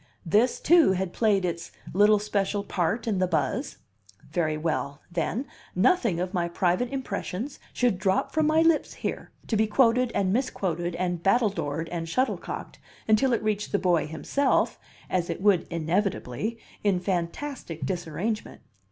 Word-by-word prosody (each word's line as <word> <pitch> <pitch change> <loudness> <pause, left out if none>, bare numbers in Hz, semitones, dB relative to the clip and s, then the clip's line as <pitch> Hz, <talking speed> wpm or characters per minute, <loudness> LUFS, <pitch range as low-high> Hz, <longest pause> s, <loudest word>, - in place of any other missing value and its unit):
This, 215 +9 +3
too, 330 - +5
had 190 -1 -2
played 205 -4 +2
its 170 -1 -4 0.2
little 205 +3 +5
special 205 -1 -1
part 195 +4 -1
in 205 -4 +1
the 185 - +2
buzz? 160 -4 -1 0.5
Very 155 -2 0
well, 150 -2 -2
then, 180 - -1 0.3
nothing 235 - +3
of 180 +2 -2
my 175 -2 0
private 180 +7 +1
impressions 255 -1 -4
should 240 -7 +1
drop 190 0 +1
from 315 -1 +2
my 315 +1 +4
lips 330 -2 +2
here, - - -4 0.2
to 225 - -1
be 220 +1 +3
quoted 245 +2 +3
and 190 -1 +1
misquoted 180 -8 -1
and 175 -1 -2
battledored 195 -7 +1
and 165 -1 -4
shuttlecocked, 255 +9 -2 0.3
until 220 +5 +4
it 235 - +1
reached 210 -1 -1
the - - +3
boy 175 -5 +2
himself 265 - 0 0.3
(as 175 -2 -1
it - - -3
would 195 -2 +3
inevitably) 175 - -1 0.3
in 200 -3 +2
fantastic 180 - -3
disarrangement. 185 +5 -3
195 Hz, 150 wpm, -27 LUFS, 175-230 Hz, 0.5 s, too